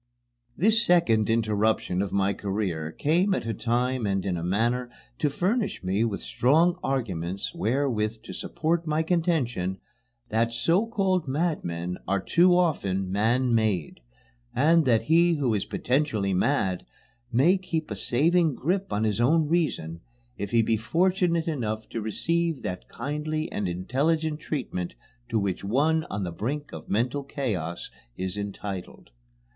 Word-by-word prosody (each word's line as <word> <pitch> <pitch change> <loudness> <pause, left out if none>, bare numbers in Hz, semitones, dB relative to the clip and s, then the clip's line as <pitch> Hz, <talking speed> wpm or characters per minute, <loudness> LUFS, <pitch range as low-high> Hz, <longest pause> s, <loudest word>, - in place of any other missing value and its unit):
This 220 +5 +4
second 140 - +3
interruption 110 -4 +1
of 100 - -2
my 100 0 +1
career 95 -6 -3
came 175 - +2
at - - -3
a 115 - -1
time 125 0 0
and 95 -1 -1
in 95 -3 0
a 85 - -3
manner 120 +7 0 0.3
to 150 - +2
furnish 200 - -1
me 95 +4 +1
with 105 -5 -2
strong 165 +8 +2
arguments 100 - -2
wherewith 115 -7 -1
to - - -8
support 165 +1 -1
my 155 +1 +1
contention 150 - 0 0.5
that 115 +1 +1
so 170 - +2
called 190 -7 0
madmen 90 - -2
are 100 +1 +1
too 175 - +4
often 95 - 0
man 120 +5 +2
made, 105 -8 0 0.6
and 160 +4 +4
that 115 -4 +3
he 170 +2 +4
who 135 -6 +1
is 105 - -1
potentially 120 -8 0
mad 95 -3 +1 0.5
may 140 +10 +4
keep 170 - -3
a - - -2
saving 155 - +2
grip 190 +6 -1
on 105 - 0
his 110 0 +1
own 155 +5 +3
reason 145 - -1 0.3
if 100 - -4
he 115 +2 +3
be 110 0 +1
fortunate 170 - +1
enough 110 -8 -2
to 115 - -4
receive 165 +8 -1
that 90 0 -5
kindly 155 +2 -3
and 100 - -2
intelligent 150 - 0
treatment 125 - -4 0.3
to 115 - +1
which 100 -3 -1
one 150 +10 +2
on 100 - -3
the 90 - -3
brink 140 - -4
of - - -9
mental 125 +7 0
chaos 105 - -3 0.3
is 95 0 -3
entitled. 100 -8 -6
120 Hz, 150 wpm, -26 LUFS, 100-160 Hz, 0.6 s, This